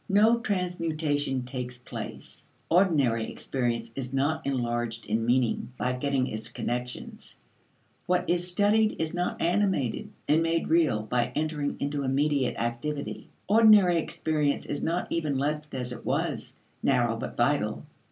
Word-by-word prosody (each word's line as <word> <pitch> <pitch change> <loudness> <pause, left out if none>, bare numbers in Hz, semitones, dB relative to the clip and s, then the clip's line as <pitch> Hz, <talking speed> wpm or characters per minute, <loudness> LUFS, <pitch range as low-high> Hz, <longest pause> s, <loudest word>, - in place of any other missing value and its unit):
No 215 +4 +5
transmutation 160 - -1
takes 125 -1 -5
place; 125 - -9 0.2
ordinary 145 - +3
experience 120 -3 -2
is 135 0 -4
not 155 +4 +1
enlarged 120 -3 -2
in 110 +2 0
meaning 120 0 +1
by 125 - 0
getting 135 0 0
its 110 -2 -5
connections; 125 +1 -5 0.7
what 180 0 +1
is 175 0 0
studied 210 +4 +2
is 160 -1 -1
not 175 0 -2
animated 175 - +1 0.2
and 155 +2 +4
made 165 0 0
real 155 -10 +3
by 120 +2 0
entering 150 -2 -1
into 145 0 -1
immediate 140 0 +1
activity. 130 +5 -3 0.2
Ordinary 210 -4 +6
experience 155 -2 0
is 145 - -3
not 170 +2 0
even 155 -5 0
left 150 +1 -2
as 125 -1 -3
it - - -9
was, - - -2 0.2
narrow 120 -4 +2
but 115 - -6
vital. 120 -3 +1
145 Hz, 135 wpm, -28 LUFS, 125-165 Hz, 0.7 s, Ordinary